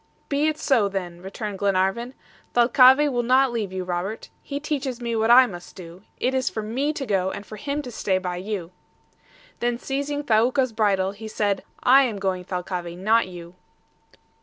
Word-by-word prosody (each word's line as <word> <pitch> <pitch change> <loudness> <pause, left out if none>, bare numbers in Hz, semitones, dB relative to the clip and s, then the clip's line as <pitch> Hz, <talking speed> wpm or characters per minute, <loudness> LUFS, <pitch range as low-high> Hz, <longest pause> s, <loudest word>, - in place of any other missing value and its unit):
"Be 290 +2 +1
it 310 -1 0
so 235 -10 +2
then!" 175 -3 -5
returned 195 +1 -6
Glenarvan. 200 +5 0 0.4
"Thalcave 260 +4 +6
will 245 -1 0
not 255 +2 +3
leave 220 -5 -3
you, 185 0 -3
Robert. 180 +4 -4
He 280 - -5
teaches 280 -4 -3
me 235 -1 -3
what 220 0 +1
I 255 +2 +8
must 175 -6 -9
do. 175 0 -11 0.2
It 255 - 0
is 260 -1 +1
for 220 - -5
me 260 +8 -1
to 285 -3 -4
go, 190 -4 0
and 200 - -7
for 215 - -9
him 285 +6 -3
to 250 - -7
stay 195 -4 0
by 180 -1 -4
you." 185 -2 -5 0.9
Then 240 0 0
seizing 285 +3 -3
Thaouka's 240 +2 +2
bridle, 195 -3 +1
he 215 +2 -9
said, 205 -2 -1 0.2
"I 265 +2 +7
am 235 -6 -1
going, 190 -2 -2
Thalcave, 180 -1 -4
not 220 +3 +2
you." 175 -1 -10
220 Hz, 185 wpm, -24 LUFS, 190-255 Hz, 0.9 s, I